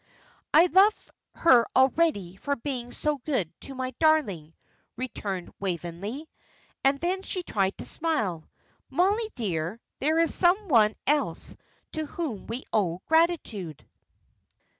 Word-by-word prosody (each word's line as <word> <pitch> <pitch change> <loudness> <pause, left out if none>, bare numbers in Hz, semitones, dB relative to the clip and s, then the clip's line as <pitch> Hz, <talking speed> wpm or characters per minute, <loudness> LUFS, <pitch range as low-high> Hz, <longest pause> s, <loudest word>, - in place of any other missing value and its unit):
"I 320 +3 +7
love 390 +4 +3 0.2
her 250 -8 +5
already 260 - +2
for 285 +8 -2
being 245 -2 -5
so 300 -1 -1
good 240 - -2
to 270 - -8
my 255 0 -3
darling," 205 - +2 0.4
returned 200 -7 -5
Waveney; 195 - -4 0.6
and 275 +1 +3
then 365 +4 -1
she 370 -1 -4
tried 195 - -1
to - - -7
smile. 215 - -1 0.4
"Mollie, 415 +5 +1
dear, 180 -2 -3 0.2
there 310 +4 +1
is 330 0 +3
some 380 +4 +3
one 220 -5 +5
else 295 +1 0 0.4
to 315 -1 -3
whom 285 - -5
we 240 +4 -5
owe 180 -5 0
gratitude." 310 - 0
265 Hz, 125 wpm, -27 LUFS, 195-320 Hz, 0.6 s, I